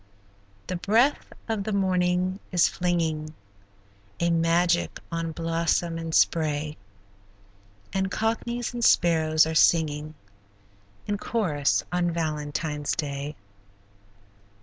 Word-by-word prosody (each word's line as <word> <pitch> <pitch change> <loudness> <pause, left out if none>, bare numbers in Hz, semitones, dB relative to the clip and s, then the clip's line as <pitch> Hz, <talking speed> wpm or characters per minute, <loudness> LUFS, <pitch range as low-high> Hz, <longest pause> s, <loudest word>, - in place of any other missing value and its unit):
The 180 - -3
breath 230 +10 +2 0.2
of 220 -3 -1
the 215 - -3
morning 185 -1 +1
is 175 -2 +4
flinging 160 -3 -1 0.8
A 170 0 +2
magic 165 - +2
on 165 -1 -2
blossom 165 +1 -1
and 165 -1 -3
spray, 150 -2 +1 1.2
And 190 0 0
cockneys 235 +3 -2
and 240 -1 -3
sparrows 160 -5 +4
are 160 - -3
singing 155 -1 +2 0.9
In 205 -1 -2
chorus 155 -14 0
on 175 -1 +1
Valentine's 150 -2 -2
day. 145 -1 -4
165 Hz, 100 wpm, -26 LUFS, 155-185 Hz, 1.2 s, is